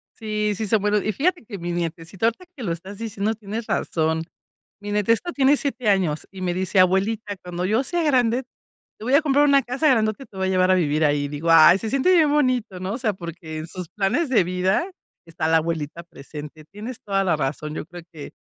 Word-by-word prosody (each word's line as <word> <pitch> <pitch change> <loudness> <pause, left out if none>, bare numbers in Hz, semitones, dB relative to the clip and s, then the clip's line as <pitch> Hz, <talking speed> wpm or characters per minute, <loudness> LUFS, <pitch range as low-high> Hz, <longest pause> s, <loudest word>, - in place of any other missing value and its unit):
Sí, 210 -1 -1
sí, 220 - -3
se 220 - +4
bueno, 210 0 +1
y 210 +1 0
fíjate 335 - 0
que 205 -3 -8
mi 175 +1 -4
nietecito, 170 +3 -3
ahorita 235 +11 -1
que 255 - -8
lo 185 - -1
estás 190 +5 -7
diciendo, 220 -1 -2
tienes 220 +1 -6
razón. 160 0 0 0.6
Mi 205 0 -5
nietecito 225 - +1
tiene 280 +1 +4
7 255 -6 -1
años, 180 -7 +1
y 190 -1 -10
me 180 -1 -1
dice: 185 +1 0
"Abuelita, 200 +3 +2
cuando 180 0 -4
yo 220 +7 +1
sea 345 +4 -1
grande, 255 -4 +2 0.6
te - - -9
voy 255 +4 +1
a 290 - +6
comprar 290 -1 +3
una 280 -1 +5
casa 260 +6 0
grandota, 220 -2 +2
y - - -18
te 205 - -17
voy 190 0 -1
a - - 0
llevar 185 0 +3
a - - +6
vivir 155 -3 +1
ahí". 145 -1 +1
Digo: 150 +3 -4
"Ay, 165 +3 +8
se 220 +2 -4
siente 275 +7 +3
bien 315 -4 +4
bonito", 255 -9 +1
¿no? 185 +3 -3
O - - -4
sea, 230 -5 0
porque 170 -3 -7
en 155 - -5
sus 180 0 -7
planes 210 +11 0
de 225 -8 +4
vida 185 - 0 0.4
está 160 -1 -3
la 160 0 +5
abuelita 160 0 -3
presente. 150 -1 -10
Tienes 215 +7 -8
toda 195 -1 0
la 175 -4 +2
razón. 150 +2 -3
Yo - - -4
creo 175 +1 -10
que 150 -3 -9
195 Hz, 225 wpm, -23 LUFS, 170-230 Hz, 0.6 s, Ay